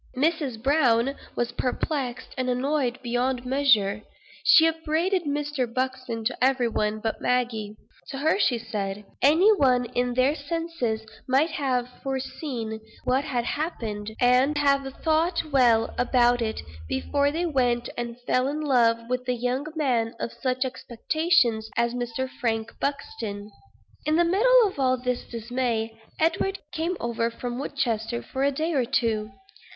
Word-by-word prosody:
Mrs. 280 -6 0
Browne 270 -2 +3 0.2
was 240 0 -1
perplexed 250 0 -3
and 255 -1 -1
annoyed 255 0 0
beyond 245 +1 -1
measure. 225 -7 +3 0.4
She 320 - +7
upbraided 325 +3 0
Mr. 290 -4 -2
Buxton 255 -2 -3
to - - -1
every 260 -2 +3
one 215 -1 -1
but 220 0 -3
Maggie. 230 -4 -1 0.3
To 270 - -6
her 315 +7 +2
she 250 - +3
said 210 -3 -4 0.2
"Any 330 - +6
one 255 -9 +3
in 245 +1 -1
their 255 +3 +3
senses 290 -7 -3 0.2
might 275 +5 +3
have 260 -6 0
foreseen 260 -4 -4 0.2
what 265 +3 +1
had 245 -5 -1
happened, 220 -10 -3
and 255 +4 +4
would 290 - +1
have 275 -1 +2
thought 325 +2 +2
well 240 -4 +4
about 245 -1 +3
it, 220 -1 -2 0.3
before 285 - 0
they 335 +4 -1
went 245 -6 +1
and 240 0 -5
fell 255 +1 +1
in 295 +2 -2
love 230 -6 +2
with 250 0 -2
a - - +3
young 250 +4 -2
man 245 -7 0
of 230 - -4
such 255 +2 -1
expectations 250 -2 +1
as 235 0 +2
Mr. 245 +1 -3
Frank 230 -3 -2
Buxton." 250 - -4 0.6
In 305 - +3
the 345 +1 +4
middle 455 +6 +5
of 375 -7 -7
all 255 -1 +3
this 250 0 -2
dismay, 230 -1 -2 0.2
Edward 335 +5 +1
came 335 +3 -2
over 230 0 -1
from 245 +1 -5
Woodchester 235 -4 -2
for 265 0 -3
a 280 - +4
day 315 +4 -1
or 265 -4 +2
two. 230 -4 0
255 Hz, 150 wpm, -26 LUFS, 235-290 Hz, 0.6 s, She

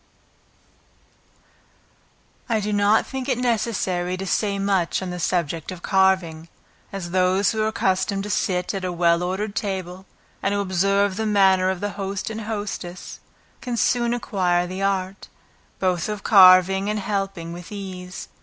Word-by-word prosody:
I 225 -2 +2
do 210 0 -2
not 205 +1 +3
think 265 0 -5
it 255 - +1
necessary 200 -7 -1
to 195 - -5
say 200 +2 0
much 195 -3 0
on 185 -1 -5
the 180 - -5
subject 165 -1 -1
of 180 -1 -9
carving, 185 -4 +1 0.4
as 185 -3 -6
those 185 +2 +2
who 220 - -2
are 215 - +1
accustomed 195 -1 0
to 210 - -4
sit 180 -2 -1
at 195 -1 -4
a 180 - -2
well 170 0 +2
ordered 190 +4 -2
table, 190 -2 -4 0.3
and 200 +1 0
who - - 0
observe 195 +1 +1
the 220 0 -1
manner 190 -3 +4
of 190 -2 -3
the 205 0 -2
host 195 +2 -3
and 220 0 -5
hostess, 205 -4 -6 0.4
can 245 -2 -3
soon 240 0 +1
acquire 180 -6 0
the 185 +2 -6
art, 195 -1 -2 0.5
both 180 -1 0
of 210 -1 -5
carving 190 0 +6
and 215 - -1
helping 195 -4 -3
with 175 +2 -10
ease. 190 -2 -7
190 Hz, 155 wpm, -23 LUFS, 180-205 Hz, 0.5 s, carving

